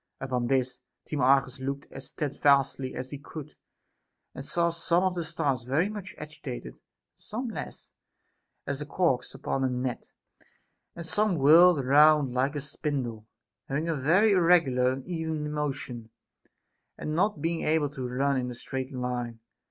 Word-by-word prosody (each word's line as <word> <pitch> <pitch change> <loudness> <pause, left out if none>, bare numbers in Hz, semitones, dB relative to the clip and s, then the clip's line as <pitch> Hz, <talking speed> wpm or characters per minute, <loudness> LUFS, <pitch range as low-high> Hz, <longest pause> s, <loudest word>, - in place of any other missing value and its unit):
Upon 125 -2 -1
this, 125 -1 0 0.3
Timarchus 135 -2 +2
looked 140 +1 -4
as - - -9
steadfastly 140 -3 +1
as 130 +1 -6
he 145 - -6
could, 150 +1 -9 0.8
and 135 - -7
saw 170 +4 +1
some 170 +1 +1
of 185 -1 +1
the 175 -1 -3
stars 145 -5 -1
very 150 +10 +1
much 210 0 -7
agitated, 135 - -7
and - - -30 0.3
some 240 +4 -6
less, 220 - -8 0.7
as 140 -1 -3
the 150 - -6
corks 145 -6 0
upon 135 - -2
a 130 - +2
net; 125 0 -3 0.8
and 170 - -7
some 210 +2 +1
whirled 155 +1 +6
round 145 -1 +5
like 135 +3 0
a 145 - -2
spindle, 135 -7 -3 0.4
having 150 +4 -2
a 165 - 0
very 175 +10 +4
irreg 180 -3 +5
ular 125 0 +2
and 130 0 -5
uneven 160 -3 -3
motion, 135 -6 -4 0.9
and 155 - -4
not 185 +1 +1
being 165 +2 -1
able 155 -2 +1
to 130 -4 -5
run 135 +2 +1
in 125 -1 -2
a 125 - -6
straight 130 +2 -5
line. 125 -2 -3
140 Hz, 160 wpm, -28 LUFS, 130-160 Hz, 0.9 s, whirled